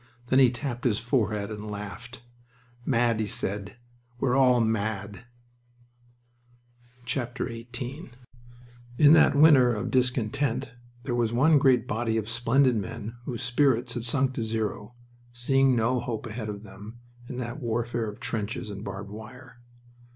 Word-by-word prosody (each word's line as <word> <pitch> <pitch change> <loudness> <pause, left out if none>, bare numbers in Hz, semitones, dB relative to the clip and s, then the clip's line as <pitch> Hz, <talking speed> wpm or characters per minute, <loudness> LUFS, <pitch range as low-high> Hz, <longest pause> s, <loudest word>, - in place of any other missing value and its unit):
Then 130 - +4
he 130 -2 +7
tapped 120 0 -5
his 115 -5 +2
forehead 110 -4 -1
and 105 0 -6
laughed. 105 +4 -8 0.6
"Mad!" 120 -3 +2
he 110 - -1
said. 100 +2 -4 0.4
"We're 125 -1 +1
all 130 -2 +5
mad!" 105 -2 -2 1.8
XVIII 120 -2 -4 1.3
In 145 +3 +7
that 160 - +5
winter 140 -5 +6
of 105 - -3
discontent 125 0 0 0.3
there 135 -3 -3
was 120 -1 0
one 145 +5 +5
great 130 -4 +4
body 110 +1 -1
of 110 -1 -2
splendid 125 +2 +2
men 115 +2 -6
whose 120 -1 -4
spirits 125 -1 +2
had 120 -1 -4
sunk 130 +2 +2
to 115 - -3
zero, 110 0 -3 0.4
seeing 135 +2 +3
no 120 +2 +1
hope 115 -3 -4
ahead 110 -1 -5
of 105 0 -6
them 105 +3 -11 0.3
in 125 - -6
that 125 +2 -5
warfare 120 -1 -2
of 105 - -10
trenches 105 -1 -4
and 100 0 -7
barbed 100 -1 -7
wire. 120 +4 -11
120 Hz, 140 wpm, -27 LUFS, 110-125 Hz, 1.8 s, he